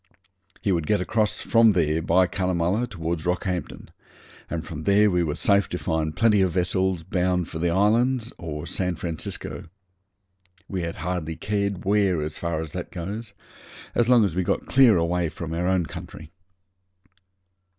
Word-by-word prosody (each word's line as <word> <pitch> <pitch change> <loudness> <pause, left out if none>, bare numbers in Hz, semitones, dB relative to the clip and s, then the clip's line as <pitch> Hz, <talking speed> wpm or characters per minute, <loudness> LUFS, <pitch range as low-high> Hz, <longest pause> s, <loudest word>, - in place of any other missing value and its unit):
He 100 - +1
could 85 -4 0
get 105 - +2
across 105 +3 0
from 115 -2 +5
there 80 -3 +1
by 95 +2 +3
Cunnamulla 90 +5 0
towards 85 -4 -4
Rockhampton, 90 0 -3 0.6
and 80 -1 -4
from 80 -2 -6
there 100 +3 +4
we 90 -1 +2
were 75 -3 -1
safe 100 -1 +2
to 90 - -3
find 80 -3 -2
plenty 110 -3 +4
of 95 - +3
vessels 95 -1 0
bound 90 -1 0
for 80 - -6
the 85 +1 +1
islands 115 +6 +2
or 75 -3 -5
San 90 -2 -2
Francisco. 80 -1 -5 1.0
We 95 -2 -3
had 85 -1 -4
hardly 85 -2 -3
cared 100 0 -2
where, 100 -3 +2
as 75 0 -4
far 85 -2 -2
as 80 -2 -7
that 90 +1 -5
goes, 100 +5 -6 0.6
as 120 0 +2
long 120 -4 +6
as 95 - -2
we 95 - 0
got 90 - -1
clear 130 -7 +5
away 85 0 0
from 80 +1 -6
our 85 +2 -1
own 95 -2 +2
country. 80 0 -9
90 Hz, 165 wpm, -24 LUFS, 85-100 Hz, 1.0 s, long